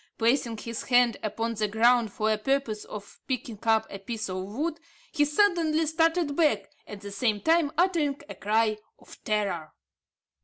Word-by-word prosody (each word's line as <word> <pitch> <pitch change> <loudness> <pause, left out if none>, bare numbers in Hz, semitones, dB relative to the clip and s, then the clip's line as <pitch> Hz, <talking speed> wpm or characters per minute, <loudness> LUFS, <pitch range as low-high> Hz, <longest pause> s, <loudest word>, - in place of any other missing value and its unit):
Placing 235 0 +1
his 230 +1 -6
hand 245 -2 +4
upon 225 +2 -2
the 215 -1 -1
ground 230 +1 +3
for 215 +2 0
the 215 - +2
purpose 240 -3 -1
of 205 -1 -10
picking 240 -5 -3
up 220 -1 +3
a 195 - -6
piece 215 0 -5
of 185 0 -3
wood, 300 - -3 0.3
he 295 - +2
suddenly 325 -1 +2
started 325 -1 +1
back, 295 -11 +1 0.2
at 205 -1 -9
the 200 -1 -8
same 210 +1 0
time 320 +2 +2
uttering 330 -6 +2
a - - -7
cry 215 +1 +1 0.2
of - - -17
terror. 195 -7 -1
230 Hz, 165 wpm, -27 LUFS, 215-295 Hz, 0.3 s, hand